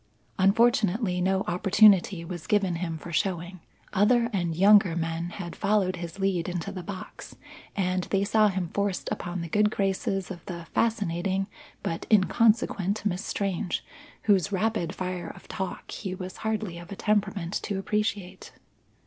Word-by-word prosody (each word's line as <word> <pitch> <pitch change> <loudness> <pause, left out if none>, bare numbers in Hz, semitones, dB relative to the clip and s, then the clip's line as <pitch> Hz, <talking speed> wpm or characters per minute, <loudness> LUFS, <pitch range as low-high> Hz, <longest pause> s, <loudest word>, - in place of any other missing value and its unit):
Unfortunately, 205 -1 +3
no 190 +1 +2
opportunity 195 -1 +4
was 175 -2 -7
given 195 -5 +2
him 165 -2 -3
for 170 +2 -9
showing. 175 +1 -1 0.3
Other 235 +4 +3
and 175 -4 -1
younger 195 -1 +6
men 165 0 -2
had 175 -1 -7
followed 195 -3 +1
his 170 +1 -7
lead 190 -3 0
into 175 -2 -3
the 185 - -6
box, 190 0 -8 0.4
and 185 -2 0
they 195 0 +1
saw 215 +1 +4
him 185 -4 -2
forced 200 -2 -1
upon 175 0 -3
the 170 - -4
good 210 +6 +3
graces 195 -1 -1
of 175 -3 -8
the 170 -3 -6
fascinating 195 -3 0 0.4
but 165 - -3
inconsequent 210 -1 +3
Miss 190 -1 -1
Strange 195 -3 -2 0.4
whose 200 -2 +3
rapid 200 -3 0
fire 180 -2 -4
of - - -12
talk 190 -1 -5
he 190 -3 -4
was 185 0 -7
hardly 215 -5 -3
of 175 +1 -12
a - - -4
temperament 200 -4 0
to 200 - -3
appreciate. 195 -2 -2
190 Hz, 150 wpm, -27 LUFS, 175-205 Hz, 0.4 s, younger